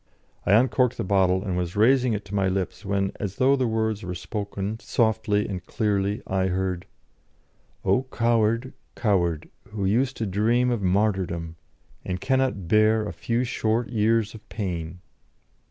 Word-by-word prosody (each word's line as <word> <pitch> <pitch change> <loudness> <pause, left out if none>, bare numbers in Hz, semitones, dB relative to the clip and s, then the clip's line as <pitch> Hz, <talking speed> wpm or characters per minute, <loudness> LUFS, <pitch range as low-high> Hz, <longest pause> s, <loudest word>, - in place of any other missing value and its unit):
I 100 - +5
uncorked 125 +2 +3
the - - -2
bottle, 95 -1 +2
and 95 -4 -2
was 90 -1 -2
raising 125 +3 +4
it 105 -1 -4
to 100 - -10
my 100 -1 +2
lips, 95 +2 -2
when, 100 -1 0
as 100 -2 -4
though 135 +2 +4
the 130 -2 0
words 110 -1 -1
were 90 -1 -5
spoken 100 +3 -4
softly 110 -3 +1
and 90 -3 -5
clearly, 100 +2 -1
I 95 0 0
heard: 95 0 -2 1.0
"O 130 +1 +2
coward, 115 +1 +1 0.2
coward, 85 -8 +1 0.2
who 100 -2 -3
used 125 +7 +1
to 110 - -2
dream 115 +6 +2
of 120 -4 -1
martyrdom, 90 -4 0 0.5
and 90 0 -3
cannot 130 -8 0
bear 110 +2 +4
a - - -5
few 120 +1 -1
short 115 -1 -1
years 110 -1 +1
of 110 -2 -13
pain!" 90 -4 -4
105 Hz, 155 wpm, -25 LUFS, 95-115 Hz, 1.0 s, I